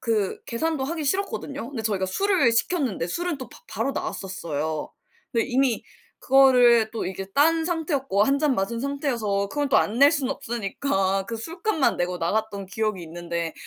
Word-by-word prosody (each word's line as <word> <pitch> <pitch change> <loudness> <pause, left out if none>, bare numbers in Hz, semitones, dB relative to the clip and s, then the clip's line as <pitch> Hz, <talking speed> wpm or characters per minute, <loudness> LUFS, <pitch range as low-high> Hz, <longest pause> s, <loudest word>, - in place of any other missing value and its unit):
그 215 -5 -1
계산도 290 +3 -1
하기 315 +2 -3
싫었거든요. 285 -6 -2
근데 240 -6 -5
저희가 200 -3 0
술을 360 - +2
시켰는데 230 - +1
술은 345 - -2
또 260 - -7
바 - - -15
바로 275 - -2
나왔었어요. 160 - -4 0.4
근데 230 -1 +1
이미 260 -2 +1 0.4
그거를 250 -4 +5
또 230 - -3
이게 190 +1 -5
딴 325 +3 +4
상태였고 295 - 0
1 275 +3 +2
잔 295 -2 +2
마신 230 +3 -2
상태여서 235 -8 -1
그건 290 +5 -1
또 270 - +4
안 220 +3 0
낼 280 +2 +8
수는 275 -4 0
없으니까 195 -5 -1
그 230 - -4
술값만 330 - 0
내고 180 +1 -1
나갔던 200 +3 -2
기억이 215 -1 -2
있는데 170 0 -4
235 Hz, 355 characters per minute, -25 LUFS, 195-280 Hz, 0.4 s, 낼